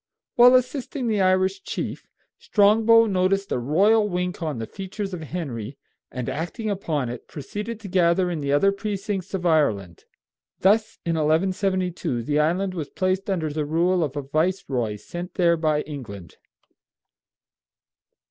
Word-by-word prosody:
While 245 +1 +7
assisting 255 +1 -1
the 215 -3 +1
Irish 190 +1 +2
chief, - - -5 0.3
Strongbow 225 +2 +5
noticed 195 0 0
a - - 0
royal 205 - +3
wink 180 -1 -3
on 155 -5 -2
the 115 - -4
features 195 - -6
of 175 - -5
Henry, 140 -7 -5 0.3
and 125 -2 -5
acting 205 - -3
upon 155 -9 -2
it 120 - -7
proceeded 210 - -6
to 205 - -7
gather 180 -1 +2
in 165 - -3
the 140 -1 -2
other 170 +8 +4
precincts 200 -1 -4
of 180 -2 -4
Ireland. 105 - +1 0.6
Thus, 215 +3 +3
in 170 - 0
1172, 180 - 0
the 145 +5 0
island 180 +5 +1
was 155 -5 -5
placed 185 +1 -1
under 165 -6 -1
the 150 +1 -2
rule 170 +4 +1
of 145 -2 -3
a 145 - -3
viceroy 140 - -1
sent 175 - -8
there 170 -2 +3
by 155 -2 +1
England. 105 - -9
180 Hz, 150 wpm, -24 LUFS, 150-195 Hz, 0.6 s, While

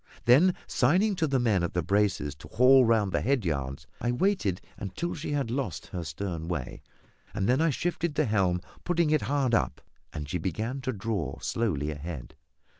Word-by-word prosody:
Then, 155 +10 +6
signing 185 - +2
to 160 - +1
the 135 -2 +1
men 110 -7 +2
at 85 - -2
the 90 - +1
braces 100 -5 +1
to 75 - -12
haul 130 +2 +6
round 110 -4 +2
the - - 0
head 130 -4 +1
yards, 70 -2 -2 0.2
I 120 - +1
waited 125 - +1 0.2
until 170 - -4
she 145 -2 -4
had 140 -6 -1
lost 125 - -3
her 90 -2 -3
stern 80 +2 -4
way, 75 -8 -4 0.5
when 125 +9 +2
I 165 - +3
shifted 170 +2 -1
the 155 - +2
helm, 95 -6 +1 0.2
putting 170 -3 +1
it 155 - +3
hard 140 -4 0
up, - - +1 0.3
and 75 -2 -5
she 90 +5 -2
began 110 - -3
to 130 0 -1
draw 100 - -3
slowly 80 -11 -1
ahead. 75 -4 -7
110 Hz, 185 wpm, -28 LUFS, 85-140 Hz, 0.5 s, Then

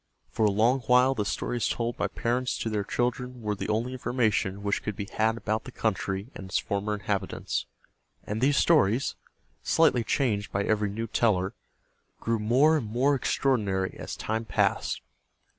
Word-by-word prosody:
For 110 - +1
a - - +3
long 115 +6 +3
while 125 +2 +5
the 105 -5 -2
stories 115 +4 -1
told 120 0 -1
by - - 0
parents 125 +2 -1
to 115 - -3
their 105 -1 0
children 125 +3 -2
were 105 0 0
the 105 - -5
only 115 +4 0
information 115 -6 0
which 100 0 0
could 105 - -4
be 100 - -4
had 110 +1 +1
about 110 0 -2
the 130 - -8
country 100 0 -2
and 95 - -8
its - - +1
former 100 +1 -1
inhabitants; 100 -2 -2 0.6
and 105 +2 -4
these 140 +2 +3
stories, 135 - +3 0.5
slightly 160 -7 +3
changed 105 -4 0
by 100 - 0
every 105 0 +1
new 110 +3 -3
teller, 100 -4 +1 0.7
grew 115 -1 0
more 130 +9 +4
and 125 -8 -3
more 125 +6 +2
extraordinary 105 -8 0
as - - -6
time 110 +1 -2
passed. 115 - 0
110 Hz, 170 wpm, -27 LUFS, 105-125 Hz, 0.7 s, while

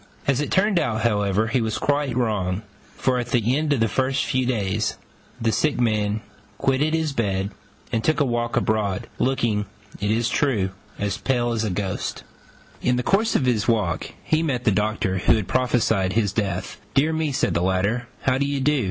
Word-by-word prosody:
As 140 0 +2
it 150 - -2
turned 190 -1 +3
out, 110 -6 -1
however, 105 -1 +1
he 125 +1 +1
was 110 -1 -1
quite 145 -3 0
wrong; 105 -5 0 0.3
for 125 -1 +1
at 120 - -3
the 120 +1 +2
end 150 +1 0
of 130 -6 +3
a 130 +4 +1
few 130 -2 0
days 100 -7 0 0.4
the 115 0 +1
sick 150 +3 +1
man 110 -2 +1 0.4
quitted 145 +4 +1
his 160 -3 -1
bed 100 -4 -1 0.4
and 115 - 0
took 155 - +2
a 145 - +3
walk 120 0 -1
abroad, 105 -4 0
looking, 115 -6 +1 0.3
it 105 - -1
is 115 +2 +2
true, 115 -7 +1 0.3
as 100 0 -2
pale 120 -2 +1
as 115 -1 0
a 110 - 0
ghost. 95 0 -3 0.6
In 125 - +2
the 125 - -1
course 215 - +2
of 130 - +2
his 110 -5 +1
walk 105 -8 0
he 155 0 +1
met 135 -7 -1
the 110 - +3
Doctor 105 -2 0
who - - +4
had 110 -4 -2
prophesied 115 -7 +1
his 105 -3 +1
death. 95 -4 -2
"Dear 155 +4 +3
me," 160 -2 0
said 130 - +1
the - - +1
latter, 100 +7 0 0.2
"how 130 0 +2
do 140 - +1
you 140 -1 -1
do? 145 +2 +2
115 Hz, 195 wpm, -23 LUFS, 105-135 Hz, 0.6 s, who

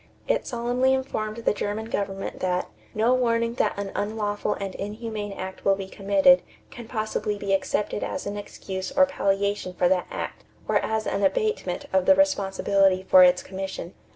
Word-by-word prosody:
It - - 0
solemnly 245 +2 +1
informed 215 -5 -3
the 230 - +1
German 210 +1 -3
government 195 -3 -3
that 180 -1 -1 0.3
"no 225 +4 +3
warning 230 -2 +1
that - - 0
an 200 -1 -4
unlawful 205 0 -1
and 195 -1 -5
inhumane 210 0 -5
act 190 -1 -7
will 195 - +4
be 195 -1 -6
committed 200 +8 +4 0.3
can 240 -3 -9
possibly 215 -2 -2
be 200 -1 -1
accepted 200 +2 -1
as 280 - -4
an 200 0 -3
excuse 190 -2 -6
or 280 0 +5
palliation 200 -6 -1
for 180 - +3
that 180 -1 +1
act - - -6 0.2
or - - +3
as 220 0 -1
an 200 - -1
abatement 430 - 0
of 190 -1 +2
the 285 - +8
responsibility 195 -8 +2
for 185 - +8
its 180 0 +4
commission." 190 -2 -6
205 Hz, 170 wpm, -25 LUFS, 195-230 Hz, 0.3 s, the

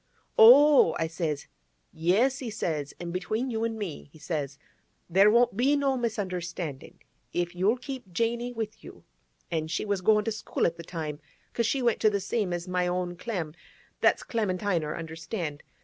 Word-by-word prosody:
"Oh!" 265 - +8
I 165 - 0
says. 160 -3 -3 0.5
"Yes," 210 +12 +2
he 250 - -4
says; 155 -9 -3
"an' 175 -1 -5
between 215 +8 -2
you 225 -1 -2
an' 225 -1 -2
me," 185 -9 -6
he 155 - -16
says, 145 -3 -4 0.5
"there 195 +4 +5
won't 240 0 +4
be 265 +6 +3
no 275 -2 +1
misunderstanding. 180 - -4 0.4
If 175 0 -1
you'll 195 +7 +2
keep 255 -6 -8
Janey 235 +5 -1
with 220 -3 -5
you"—an' - - -8
she 165 +5 -2
was 200 -2 -1
goin' 210 +2 +3
to 225 - 0
school 215 - -2
at 165 - +1
the 170 - -8
time, 155 -3 -5 0.3
'cause 235 -1 +1
she 270 +1 0
went 235 -2 +2
to 215 - +4
the 200 -1 -1
same 205 -1 -1
as 175 +1 -3
my 180 0 0
own 180 0 -2
Clem—that's 175 -6 -2
Clemintiner—understand? 165 -5 -2
185 Hz, 165 wpm, -28 LUFS, 165-230 Hz, 0.5 s, Oh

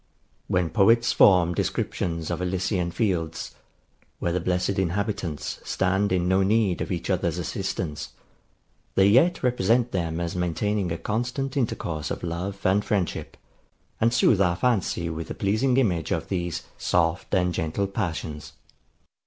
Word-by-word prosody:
When 90 -2 0
poets 115 +3 +4
form 90 -3 +5
descriptions 85 -1 -2
of - - -2
Elysian 90 0 -1
fields, 85 -5 -2 0.6
where 85 - -1
the 90 - 0
blessed 90 +2 0
inhabitants 95 -3 -2
stand 95 +1 0
in 90 -1 +1
no 95 +1 +3
need 100 -2 +2
of - - -3
each 85 +1 -2
other's 85 -2 0
assistance, 90 -3 -4 0.8
they 95 - +5
yet 130 - +4
represent 120 0 +2
them 85 -2 -2
as 85 0 -3
maintaining 90 +2 -1
a 85 - -1
constant 120 - -2
intercourse 85 - -2
of - - -5
love 90 +4 -3
and 100 +2 +3
friendship, 100 -5 -2 0.6
and 115 +1 +3
sooth 110 -3 +4
our 90 -2 +3
fancy 95 -6 0
with 80 0 -4
the - - -6
pleasing 110 +6 +1
image 90 - +1
of - - -2
these 85 -5 -2 0.2
soft 85 0 0
and 90 -1 +2
gentle 80 +5 -1
passions. 85 -6 -4
95 Hz, 145 wpm, -25 LUFS, 85-105 Hz, 0.8 s, form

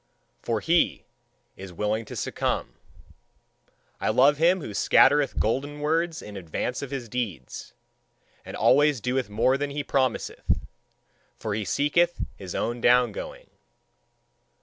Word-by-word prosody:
for - - -1
he - - +1 0.5
is 95 -1 -9
willing 105 +5 -2
to - - -9
succumb. - - -2 1.3
I - - 0
love 140 +3 +4
him 175 +3 +4
who 105 - -6
scattereth 145 +6 +4
golden 140 +6 -1
words 165 +2 -1
in 105 - -9
advance 95 +7 -4
of 140 - -5
his 130 -3 -5
deeds, 105 - -5 0.7
and - - -8
always 145 0 +4
doeth 125 +1 -1
more 125 +6 +2
than 145 0 -2
he 145 +1 -3
promiseth: 130 -4 -1 0.8
for 110 - -4
he 105 +1 -2
seeketh 170 - +1 0.2
his 95 -2 -8
own 120 +1 -2
down 125 +1 +4
going. - - -8
130 Hz, 130 wpm, -26 LUFS, 110-145 Hz, 1.3 s, love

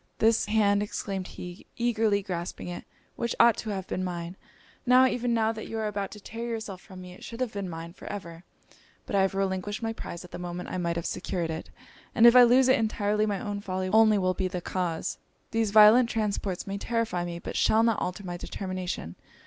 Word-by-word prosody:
'This 225 0 +3
hand,' 205 -2 +3
exclaimed 195 -2 -4
he, 180 0 -9
eagerly 225 -4 +1
grasping 175 -3 -5
it, 175 - -6 0.3
'which 235 - -2
ought 235 -1 +7
to 220 - -5
have 190 -3 -3
been 185 - -3
mine! 175 -1 -4 0.5
Now, 255 0 +6
even 245 -1 0
now, 225 -1 +2
that 220 -1 -7
you 225 - -5
are 220 - -1
about 200 -2 -2
to 210 - -10
tear 230 +3 -6
yourself 220 -5 -5
from 185 -2 -12
me, 180 0 -10
it - - -14
should 230 - -8
have 255 -3 -2
been 200 -2 -4
mine 165 0 -7
for - - -12
ever! 170 -4 -7 0.6
But - - -3
I 195 - +4
have 190 0 +1
relinquished 195 +3 -2
my 225 0 -1
prize 175 -5 -7
at 180 - -15
the - - -7
moment 180 0 -5
I 185 - -3
might 170 -1 -1
have 170 - -3
secured 170 -3 -2
it; 160 - -6 0.5
and 230 - +6
if 235 +1 +9
I 250 - +10
lose 250 +2 +6
it 260 - +4
entirely 215 -1 +1
my 200 -2 -1
own 205 +1 -4
folly 185 -1 -3
only 220 +1 +5
will 185 -1 +1
be 185 0 -1
the 180 -1 -4
cause.' 175 -2 -3 0.3
'These 225 -1 +1
violent 215 +4 +7
transports 205 -5 -2
may 200 0 -4
terrify 230 -6 -1
me, 175 -1 -4
but - - -7
shall 220 +1 +4
not 230 -2 +2
alter 180 +3 -3
my 175 -2 -5
determination. 185 - -5
200 Hz, 220 wpm, -28 LUFS, 180-225 Hz, 0.6 s, I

